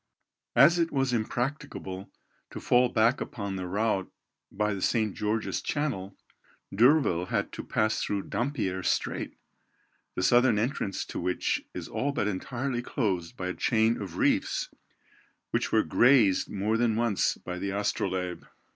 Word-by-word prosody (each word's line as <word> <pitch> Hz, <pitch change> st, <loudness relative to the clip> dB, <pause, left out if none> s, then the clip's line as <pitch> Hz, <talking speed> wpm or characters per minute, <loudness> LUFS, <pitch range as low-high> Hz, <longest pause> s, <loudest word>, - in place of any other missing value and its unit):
As 170 Hz, +1 st, +6 dB
it 165 Hz, -1 st, +1 dB
was 135 Hz, -2 st, 0 dB
impracticable 110 Hz, -5 st, -3 dB, 0.4 s
to -, -, -7 dB
fall 125 Hz, 0 st, +3 dB
back 115 Hz, +5 st, +2 dB
upon 100 Hz, -4 st, -4 dB
the 90 Hz, -1 st, -4 dB
route 100 Hz, 0 st, -1 dB, 0.4 s
by 105 Hz, +1 st, 0 dB
the 95 Hz, -, -5 dB
St. 110 Hz, -2 st, +1 dB
George's 105 Hz, +3 st, -1 dB
Channel, 110 Hz, -11 st, -3 dB, 0.6 s
D'Urville 115 Hz, -, +4 dB
had -, -, -1 dB
to -, -, -6 dB
pass 110 Hz, 0 st, 0 dB
through 100 Hz, -1 st, -1 dB
Dampier's 95 Hz, -8 st, -2 dB
Strait, -, -, -2 dB, 0.8 s
the 90 Hz, -, -1 dB
southern 120 Hz, +2 st, +4 dB
entrance 110 Hz, -3 st, -2 dB
to -, -, -6 dB
which 90 Hz, -1 st, -1 dB
is -, -, -5 dB
all 140 Hz, +1 st, -2 dB
but 105 Hz, -, 0 dB
entirely 120 Hz, +6 st, -2 dB
closed 95 Hz, -10 st, -2 dB
by 90 Hz, -1 st, -3 dB
a -, -, -2 dB
chain 110 Hz, +1 st, +1 dB
of 100 Hz, -, -6 dB
reefs, -, -, +1 dB, 0.8 s
which -, -, 0 dB
were -, -, +4 dB
grazed 120 Hz, -7 st, +4 dB
more 105 Hz, +3 st, 0 dB
than 115 Hz, -2 st, +2 dB
once 115 Hz, -3 st, +1 dB
by 90 Hz, 0 st, -6 dB
the 100 Hz, +2 st, -2 dB
Astrolabe. 95 Hz, -3 st, -2 dB
110 Hz, 145 wpm, -28 LUFS, 95-125 Hz, 0.8 s, As